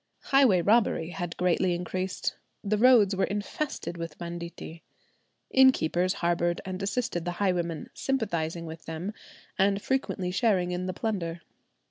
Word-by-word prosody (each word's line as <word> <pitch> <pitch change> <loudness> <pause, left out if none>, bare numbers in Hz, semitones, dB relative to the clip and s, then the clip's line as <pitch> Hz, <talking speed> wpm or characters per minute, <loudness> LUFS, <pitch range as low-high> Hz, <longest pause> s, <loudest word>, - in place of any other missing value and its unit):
Highway 240 -11 +5
robbery 205 -5 +2
had 175 -2 -5
greatly 180 0 +2
increased. 185 +2 -3 0.3
The 210 0 0
roads 225 -5 +6
were 190 - +2
infested 205 - -4
with 165 -2 -6
banditti. 170 -1 -7 0.7
Innkeepers 185 -9 +4
harboured 175 0 +1
and 185 0 -5
assisted 200 -3 -1
the 175 +1 -3
highwaymen, 175 -5 -1
sympathizing 170 -11 -2
with 160 0 -9
them, 165 +6 -4 0.5
and 195 +1 +3
frequently 205 -6 -1
sharing 185 -2 +2
in 180 +1 -2
the 185 - -2
plunder. 175 -6 -3
180 Hz, 130 wpm, -28 LUFS, 170-205 Hz, 0.7 s, roads